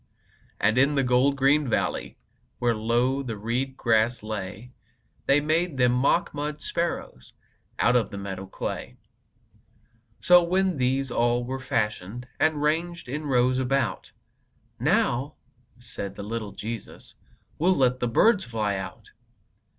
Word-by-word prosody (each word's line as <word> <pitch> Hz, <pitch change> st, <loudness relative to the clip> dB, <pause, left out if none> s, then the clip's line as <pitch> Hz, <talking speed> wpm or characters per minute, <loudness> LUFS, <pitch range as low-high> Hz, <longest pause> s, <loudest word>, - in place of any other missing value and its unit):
And 110 Hz, +4 st, +3 dB
in 140 Hz, +2 st, +3 dB
the 135 Hz, -, +2 dB
gold 125 Hz, +2 st, +3 dB
green 140 Hz, +1 st, +3 dB
valley, -, -, -1 dB, 0.4 s
Where 120 Hz, -1 st, +1 dB
low 120 Hz, +5 st, +1 dB
the 115 Hz, -5 st, -5 dB
reed 125 Hz, +5 st, -2 dB
grass 115 Hz, 0 st, +2 dB
lay, 110 Hz, +2 st, -6 dB, 0.6 s
They 140 Hz, +1 st, +5 dB
made 155 Hz, +1 st, 0 dB
them 125 Hz, -1 st, +4 dB
mock 130 Hz, +7 st, +2 dB
mud 150 Hz, +1 st, -4 dB
sparrows 160 Hz, -, -4 dB, 0.4 s
Out 125 Hz, -, +3 dB
of 115 Hz, -5 st, +2 dB
the 100 Hz, -, -7 dB
meadow 95 Hz, -1 st, -6 dB
clay. -, -, -5 dB, 1.2 s
So, 180 Hz, 0 st, +6 dB
when 185 Hz, 0 st, +1 dB
these 130 Hz, +1 st, 0 dB
all 120 Hz, +1 st, +1 dB
were 130 Hz, +2 st, -4 dB
fashioned, 115 Hz, -1 st, -2 dB
And 155 Hz, -2 st, +2 dB
ranged 170 Hz, +2 st, -1 dB
in 150 Hz, +4 st, -4 dB
rows 130 Hz, -1 st, +2 dB
about, 135 Hz, +1 st, -1 dB, 0.7 s
"Now," 135 Hz, +5 st, +1 dB, 0.4 s
said 100 Hz, -5 st, -6 dB
the 100 Hz, -, -7 dB
little 110 Hz, -1 st, -5 dB
Jesus, 115 Hz, -1 st, -7 dB, 0.5 s
"We'll 180 Hz, +4 st, +3 dB
let 130 Hz, -1 st, +2 dB
the 120 Hz, -, 0 dB
birds 200 Hz, -, +4 dB
fly 110 Hz, -, -2 dB
out." 95 Hz, 0 st, -8 dB
125 Hz, 135 wpm, -26 LUFS, 115-145 Hz, 1.2 s, So